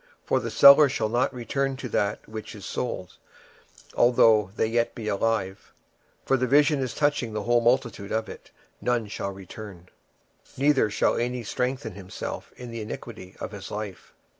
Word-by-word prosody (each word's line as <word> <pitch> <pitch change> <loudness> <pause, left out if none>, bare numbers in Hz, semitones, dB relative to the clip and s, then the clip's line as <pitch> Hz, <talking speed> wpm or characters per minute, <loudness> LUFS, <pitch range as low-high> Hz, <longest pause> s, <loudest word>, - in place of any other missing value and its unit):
26:007:013 - - -38
For - - +3
the - - -4
seller 140 +1 +8
shall 120 -5 -1
not 120 +4 +1
return 135 +2 -2
to 130 - -5
that 100 -1 -1
which 110 0 -8
is 100 - -10
sold, 95 -8 -4 0.8
although 115 -4 +4
they 110 - +1
were - - -8
yet 120 0 +1
alive: 105 -2 -2 0.5
for 135 - +3
the 130 0 0
vision 145 +2 +4
is 130 -2 -3
touching 145 -6 0
the 105 -1 -3
whole 120 +2 +3
multitude 120 -4 +1
thereof, 110 0 -1
which 120 -4 -5
shall - - -3
not 100 - -6
return; 95 -1 -10 0.7
neither 135 -4 +3
shall 100 - +1
any 120 +1 -2
strengthen 125 0 -2
himself 95 -1 -7
in 125 -1 -8
the 115 -1 -5
iniquity 105 -3 -8
of - - -5
his 100 -2 -8
life. 105 -3 -7
115 Hz, 170 wpm, -26 LUFS, 105-125 Hz, 0.8 s, seller